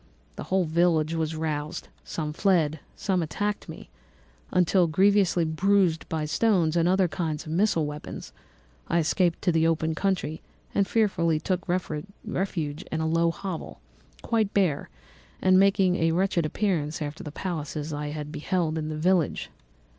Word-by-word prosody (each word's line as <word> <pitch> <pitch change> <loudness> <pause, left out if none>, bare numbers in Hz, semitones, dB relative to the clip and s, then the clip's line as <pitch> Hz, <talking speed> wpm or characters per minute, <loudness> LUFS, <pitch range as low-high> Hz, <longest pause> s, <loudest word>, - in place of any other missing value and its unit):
The - - -6
whole 190 0 +2
village 165 -1 +2
was 160 -1 -1
roused; 155 -1 -3 0.2
some 150 -2 -4
fled, 160 -4 +2 0.2
some 190 -3 0
attacked 205 +6 -3
me, - - -10 0.6
until, 180 0 +3
grievously 185 0 +3
bruised 175 +1 +2
by 160 -2 -1
stones 170 -1 +2
and 170 -1 +3
many 180 - +4
other 190 -1 +3
kinds 160 -3 -3
of 155 - -6
missile 170 -2 +2
weapons, 150 - -7 0.5
I 170 - +1
escaped 170 +1 +1
to 180 - +3
the 165 0 +3
open 160 0 +1
country 170 -3 -1 0.3
and 200 -1 +2
fearfully 180 -8 +2
took 180 +2 -2
refuge 175 -2 -3
in 160 - -1
a 160 - 0
low 165 +1 +2
hovel, 180 0 -6 0.4
quite 220 -3 0
bare, 180 -8 +1 0.5
and 185 0 +5
making 190 -2 +4
a 165 0 +2
wretched 175 -2 +1
appearance 160 -5 -1
after 150 0 -5
the 150 - -6
palaces 155 -3 -4
I 150 0 -3
had 150 0 -5
beheld 160 0 -1
in 155 0 -3
the 155 - -4
village. 175 +1 +1
165 Hz, 155 wpm, -26 LUFS, 155-185 Hz, 0.6 s, and